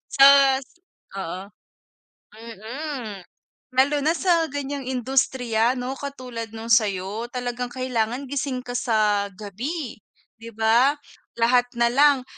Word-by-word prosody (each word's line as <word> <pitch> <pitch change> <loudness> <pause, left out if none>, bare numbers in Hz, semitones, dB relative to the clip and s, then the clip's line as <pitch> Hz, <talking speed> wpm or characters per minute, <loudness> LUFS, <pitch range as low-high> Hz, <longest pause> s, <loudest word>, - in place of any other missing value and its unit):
Sus, 275 -1 +7 0.5
oo. 190 +2 -5 0.9
Mm, 230 - -7 0.5
lalo 285 +3 +4
na 320 +2 +3
sa 340 -3 +2
ganyang 285 -1 -4
industriya 250 -2 +1
no 250 +2 -3
katulad 250 -5 -6
nung 225 +1 -8
sa'yo. 210 +1 +1
Talagang 245 0 -3
kailangan 255 0 -2
gising 265 -2 -2
ka 245 - -5
sa 210 -4 +1
gabi, 230 - -5 0.4
'di 230 - -8
ba? 235 +6 +4 0.4
Lahat 245 +1 +4
nalang 260 +3 +4
245 Hz, 105 wpm, -23 LUFS, 225-275 Hz, 0.9 s, Sus